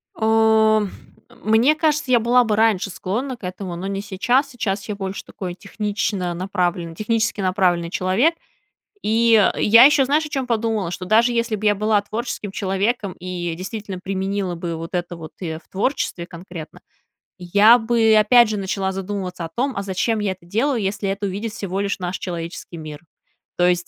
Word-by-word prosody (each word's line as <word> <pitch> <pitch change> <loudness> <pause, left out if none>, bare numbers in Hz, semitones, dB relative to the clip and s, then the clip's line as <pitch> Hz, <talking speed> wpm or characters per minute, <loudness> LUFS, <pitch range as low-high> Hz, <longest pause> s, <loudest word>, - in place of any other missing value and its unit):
О, 220 -1 +3 0.4
мне 225 +8 +2
кажется, 305 -3 0
я 240 - +6
была 245 +2 +4
бы 215 -2 0
раньше 215 -3 +2
склонна 240 +8 -3
к 215 - -25
этому, 180 0 -5
но 185 +3 -5
не 195 0 -3
сейчас. 245 +8 +1
Сейчас 205 -5 -3
я 210 - -2
больше 195 -1 -5
такой 180 -2 -6
технично-направленный, 185 -4 -2
технически 215 0 -1
направленный 185 -3 +1
человек. 195 - +1 0.7
И 230 +2 +3 0.3
я 230 +3 +7
ещё, 275 -1 +6
знаешь, 300 +4 +1
о 300 - -7
чём 270 -3 -2
подумала: 220 -5 0
что 185 +1 -5
даже 230 +5 +4
если 230 -1 0
б 210 - -6
я 205 - +4
была 210 0 +2
творческим 215 -1 -5
человеком 200 +1 -1
и 175 -1 -4
действительно 195 +1 -6
применила 190 -1 -2
бы 170 0 -4
вот 165 +3 -7
это 175 0 -3
вот 160 -2 -10
и 160 -3 -4
в - - -33
творчестве 195 -4 -2
конкретно, 170 -2 -10 0.6
я 205 +6 +5
бы, 225 -1 +3
опять 235 +2 +6
же, 215 - -2
начала 190 0 -2
задумываться 190 -2 -4
о 165 - -7
том, 265 +2 0
а 200 - -2
зачем 200 +4 -1
я 205 -2 0
это 185 -2 -10
делаю, 230 +6 0
если 195 0 -2
это 200 +1 -2
увидит 205 +4 -4
всего 195 -2 -4
лишь 200 -1 -2
наш 180 +1 -3
человеческий 170 -1 -6
мир? 155 -2 -8 0.6
То 175 0 +4
есть, 175 0 +1
200 Hz, 175 wpm, -21 LUFS, 185-225 Hz, 0.7 s, я